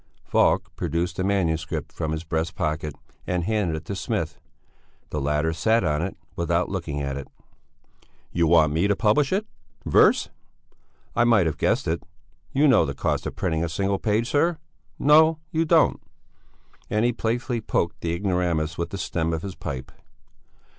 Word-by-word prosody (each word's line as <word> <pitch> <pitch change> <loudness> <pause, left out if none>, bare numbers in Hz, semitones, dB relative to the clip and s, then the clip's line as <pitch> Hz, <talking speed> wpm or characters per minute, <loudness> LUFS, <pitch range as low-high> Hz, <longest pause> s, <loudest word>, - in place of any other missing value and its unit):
Falk - - +2
produced 85 +1 -2
a - - +1
manuscript 80 -5 -1
from 80 -2 -3
his 80 +1 -3
breast 80 +1 -2
pocket 75 -2 -2 0.3
and 90 -1 0
handed 100 -4 0
it 80 - -7
to 100 - -4
Smith; - - -3 0.7
the 75 - -2
latter 75 +3 0
sat 110 +8 +2
on 75 -2 +1
it 95 +3 -4 0.2
without 85 +1 0
looking 85 -7 -3
at 70 0 -3
it. 70 - -7 1.0
"You 85 -1 +2
want 80 -3 +5
me 85 +6 +2
to 100 - +2
publish 115 +7 +2
it? 200 +3 +1 0.4
Verse? - - +4 0.9
I - - +4
might 115 -6 +4
have 80 - -2
guessed - - +1
it! 80 +1 0
Do 85 - -11
you 150 - +6
know 130 -5 +5
the - - -3
cost - - -1
of - - -6
printing 80 0 -1
a 85 - -1
single 95 +4 -1
page, 110 +2 +1
sir? 160 +5 +2 0.4
No, 155 +2 +5
you 160 +1 +1
don't." - - +3 0.9
And 105 +2 +1
he 120 - +2
playfully 120 +2 -1
poked 85 -4 -1
the 85 - -1
ignoramus 85 -4 -1
with 85 - -2
the 100 - -5
stem 85 -3 -1
of 80 - -3
his 100 -1 -5
pipe. 65 -6 -6
85 Hz, 175 wpm, -24 LUFS, 80-110 Hz, 1.0 s, you